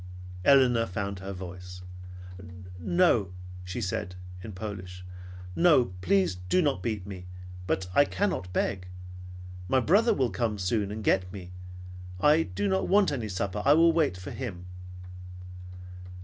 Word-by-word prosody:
Elinor 125 -2 +5
found 100 +1 -4
her 95 +1 -6
voice. 90 -1 -8 1.0
"No," 115 - +2 0.3
she 90 0 -5
said 90 0 -3 0.3
in 110 - -7
Polish. 90 -2 -7 0.5
"No, 150 - +4
please 190 - +2 0.2
do - - +4
not 145 - +1
beat 105 -2 -3
me, 95 -3 -8 0.4
but 95 -1 -1
I 145 - +6
cannot 185 - -2
beg. 95 0 -1 0.8
My 130 - +3
brother 200 - +4
will 130 -5 +1
come 105 +3 -1
soon 100 +2 -1
and 110 +1 -5
get 90 -2 +2
me. 90 -2 -9 0.7
I 150 - +5
do 100 - -2
not 95 0 +1
want 200 -3 +4
any 120 -6 -3
supper. 100 +2 -2
I 145 - +6
will 165 +1 +5
wait 155 - +1
for 90 +1 -8
him." 100 -9 -6
100 Hz, 140 wpm, -28 LUFS, 90-135 Hz, 1.0 s, I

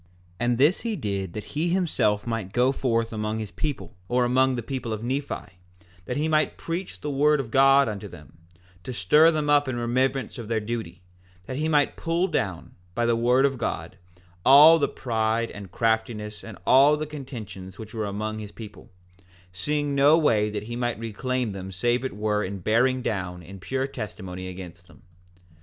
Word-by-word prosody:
4:19 85 - -31 0.3
And 120 0 +1
this 145 +8 +3
he 230 -2 -2
did 100 - -3
that 105 - -5
he 160 +4 -2
himself 160 - +1
might 115 -5 -3
go 125 +2 +3
forth 115 -4 -1
among 110 0 -2
his 110 -2 -5
people, 150 -4 -4
or 125 +2 +2
among 130 +1 +3
the 120 - -4
people 125 -2 -4
of 110 +1 -5
Nephi, 125 -7 -4 0.5
that 125 - -3
he 150 +2 0
might 155 -1 +1
preach 175 +3 -5
the 150 - -3
word 150 +2 +3
of 120 -5 -4
God 135 +1 +5
unto 105 -1 -5
them, 80 -3 -14 0.4
to 130 - -5
stir 150 - +5
them 155 -2 0
up 145 -1 +4
in 130 - -2
remembrance 125 +1 -1
of 115 - -7
their 115 0 0
duty, 105 -6 -5 0.3
and 90 - -30
that 130 - -5
he 155 - 0
might 145 -2 +2
pull 165 +2 0
down, 100 - -3 0.2
by 120 - +1
the 115 0 +3
word 125 +3 +3
of 135 -3 0
God, 95 -4 -4 0.4
all 150 +5 +8
the 145 - +2
pride 115 -1 -1
and 100 -3 -9
craftiness 110 -1 -1
and 115 -3 -9
all 140 +3 +6
the 155 - -3
contentions 110 -10 -8
which 110 +1 -9
were 110 -2 -2
among 110 +2 -4
his 105 -1 -8
people, 105 -3 -11 0.6
seeing 145 +10 -1
no 140 +3 +5
way 110 -10 +2
that 105 0 -4
he 120 +2 -6
might 120 -2 -1
reclaim 115 +2 -2
them 95 -1 -7
save 120 +7 0
it 130 - -4
were 105 0 0
in 100 +2 -4
bearing 120 +7 +2
down 90 -5 -3
in 95 +4 -11
pure 130 +7 -2
testimony 95 -7 -7
against 90 -1 -9
them. 85 - -19
120 Hz, 195 wpm, -25 LUFS, 105-135 Hz, 0.6 s, all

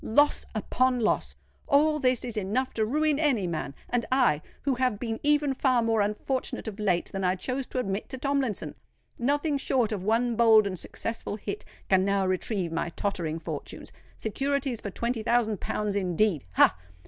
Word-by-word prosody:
"Loss 290 +6 +3
upon 255 +4 +1
loss! 215 - 0 0.3
All 300 +1 +4
this 255 -2 +1
is 240 -2 -5
enough 215 +6 -1
to 220 - +1
ruin 300 +3 +1
any 270 - +2
man! 160 -5 -3
And 245 -1 0
I—who 260 - +1
have 250 -4 +1
been 225 0 -3
even 295 -1 +2
far 255 -3 +2
more 225 -1 +2
unfortunate 210 +5 -2
of 215 -1 -6
late 185 -5 0
than 195 0 -3
I 180 0 +2
chose 255 +7 -3
to - - -6
admit 200 -4 -2
to 265 - -5
Tomlinson! 275 -5 -1 0.5
Nothing 285 +3 +1
short 250 -5 +1
of 205 -4 -2
one 230 +3 +1
bold 220 -2 +6
and 185 -3 -3
successful 225 -2 -4
hit 200 -1 -6 0.2
can 190 -1 +4
now 200 0 +1
retrieve 185 -1 -1
my 165 +1 -1
tottering 170 -4 -2
fortunes. 165 - -6 0.3
Securities 270 +2 -1
for 200 - -4
twenty 235 +4 -2
thousand 220 -3 +1
pounds, 210 -1 -2
indeed! 185 -3 +1
Ha! - - +5
225 Hz, 170 wpm, -27 LUFS, 200-260 Hz, 0.5 s, bold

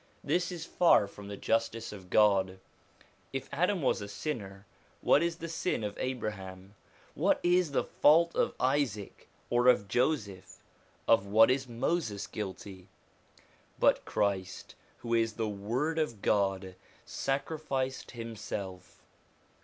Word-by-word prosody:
This 175 0 0
is 170 -2 -6
far 165 - +4
from 100 0 -11
the 100 0 -6
justice 115 0 -1
of 95 -3 -11
God. 95 -3 +3 0.7
If 135 -1 -4
Adam 180 +3 +1
was 130 - +1
a 100 - -5
sinner, 100 -4 -5 0.4
what 145 - +4
is 170 0 0
the 165 0 -7
sin 165 -6 -2
of 105 -1 -3
Abraham? 100 -6 -5 0.4
What - - +2
is 175 -1 +3
the 140 - 0
fault 165 +3 +4
of - - +1
Isaac, 130 -7 -1 0.2
or 120 +1 +3
of 120 -6 +5
Joseph? 110 -6 -1 0.5
Of 100 -3 +4
what 110 +4 +6
is 130 -1 -1
Moses 120 - -1
guilty? 95 -2 -7 0.9
But - - +3
Christ, 95 -2 -2 0.2
who 115 -1 -4
is 115 -1 +2
the 110 -1 -2
Word 120 +11 -2
of 120 -10 -2
God, 95 -2 +1 0.3
sacrificed 135 -1 -2
him 115 -2 -7
self. 95 -3 -7
115 Hz, 135 wpm, -30 LUFS, 100-140 Hz, 0.9 s, what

